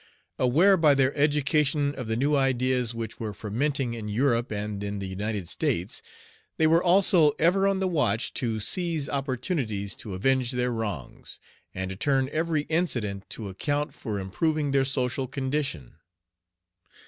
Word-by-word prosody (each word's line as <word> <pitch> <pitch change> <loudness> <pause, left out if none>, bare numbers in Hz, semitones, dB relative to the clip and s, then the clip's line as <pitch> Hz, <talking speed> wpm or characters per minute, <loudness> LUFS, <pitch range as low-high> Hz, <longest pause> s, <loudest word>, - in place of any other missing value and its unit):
Aware 165 +11 +5
by 155 -4 +5
their 135 0 +2
education 145 0 +2
of 130 -5 -6
the 110 - 0
new 140 +5 +1
ideas 130 -3 +1
which 115 -1 -6
were 110 -3 -4
fermenting 125 +4 -1
in 110 -2 -6
Europe 120 +2 +1
and 105 -1 -4
in 100 0 -3
the 100 - -4
United 100 0 -3
States, 85 +4 -1 0.6
they 160 - +3
were 165 +2 +4
also 175 -4 +5
ever 195 +4 +3
on 195 -1 +1
the 190 - +1
watch 135 - +1
to 115 -3 -1
seize 165 - -1
opportunities 130 - -2
to 100 -4 -7
avenge 130 +5 +1
their 125 0 0
wrongs, 105 - -5 0.4
and 95 0 -3
to - - -5
turn 135 +5 +1
every 160 -1 0
incident 120 - -1
to 110 - -5
account 145 +10 -2
for 105 -5 -4
improving 145 - -1
their 135 -1 +3
social 130 -1 -1
condition. 135 - -3
130 Hz, 155 wpm, -26 LUFS, 110-150 Hz, 0.6 s, Aware